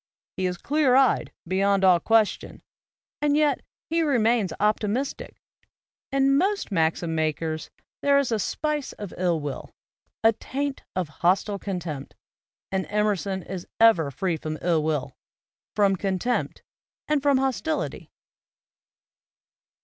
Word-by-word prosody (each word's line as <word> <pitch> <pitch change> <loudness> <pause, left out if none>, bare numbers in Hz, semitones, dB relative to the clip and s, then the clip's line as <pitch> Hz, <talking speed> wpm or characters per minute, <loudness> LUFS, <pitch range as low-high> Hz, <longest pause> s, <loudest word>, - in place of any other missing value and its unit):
He 185 - 0
is 180 -1 -3
clear 285 - +2
eyed, 265 -1 +3 0.2
beyond 195 +2 +2
all 180 -2 +6
question, 225 +2 +1 0.6
and 295 0 +2
yet 300 -2 +2 0.3
he 330 +1 +1
re 290 -5 +2
mains 225 -4 +2
optimistic. 215 +5 -1 0.7
In 275 0 +3
most 400 - 0
maxim 165 -1 +1
makers 155 0 -2 0.3
there 280 0 +4
is 280 -4 +1
a 220 - +1
spice 300 +6 -2
of 205 -3 -8
ill 175 -3 +1
will, 145 -2 -6 0.5
a 225 0 +6
taint 280 +5 -4
of 185 -3 -1
hostile 195 +3 +2
contempt; 170 -9 -5 0.6
and 190 -1 -1
Emerson 205 -3 0
is 185 -2 -7
ever 220 -10 +5
free 170 +4 -2
from 155 0 -5
ill 170 -3 +2
will, 145 -4 -2 0.6
from 200 -2 +3
con 190 0 -1
tempt 245 +6 -2 0.4
and 300 -2 +1
from 280 -1 +3
hostility. 270 +4 -2
200 Hz, 130 wpm, -25 LUFS, 175-270 Hz, 0.7 s, all